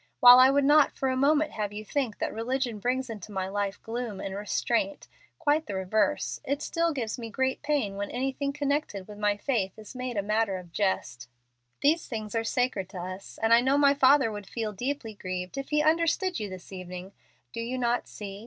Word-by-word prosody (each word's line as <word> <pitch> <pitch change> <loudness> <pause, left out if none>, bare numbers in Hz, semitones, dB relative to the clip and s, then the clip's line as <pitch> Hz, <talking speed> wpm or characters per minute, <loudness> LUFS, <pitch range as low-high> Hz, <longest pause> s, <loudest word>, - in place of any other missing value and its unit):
While 245 0 +10
I 260 +1 +8
would 280 0 +3
not 295 +1 +6
for 265 - -2
a 260 - 0
moment 295 +3 +3
have 210 -2 -3
you 210 +1 -7
think 255 -4 -2
that - - -2
religion 240 0 -2
brings 255 +4 -1
into 215 -3 -8
my 190 -2 -2
life 200 0 -2
gloom 230 -3 -4
and 195 - -4
restraint 235 +8 -1 0.3
quite 300 +1 +1
the 200 - -4
reverse 215 +10 0 0.2
still 335 +3 0
it 320 - -4
gives 230 -3 -3
me 230 -1 -6
great 260 +4 -1
pain 285 -10 -1
when 200 0 -3
anything 270 +3 -2
connected 280 -9 -2
with 210 -1 -10
my 205 -1 +1
faith 205 -5 -1
is 215 +2 -11
made 255 -2 -4
a 200 - +1
matter 210 -1 +1
of 180 -2 -11
jest. 125 - -2 0.5
These 315 +4 +3
things 215 -3 -5
are 225 -1 0
sacred 225 -5 -1
to 190 - -9
us, 185 +2 -7
and 225 +1 +5
I 235 - +7
know 265 +3 +2
my 280 -1 +5
father 270 -3 +5
would 205 -2 -7
feel 220 -3 -3
deeply 245 +1 -3
grieved 185 -2 -5
if 275 0 -5
he 300 0 +2
understood 335 - +2
you 210 -2 -4
this 185 0 -10
evening. 185 0 -7 0.4
Do - - -5
you 245 +3 -3
not 240 -1 0
see? 200 -1 -8
230 Hz, 210 wpm, -28 LUFS, 200-275 Hz, 0.5 s, While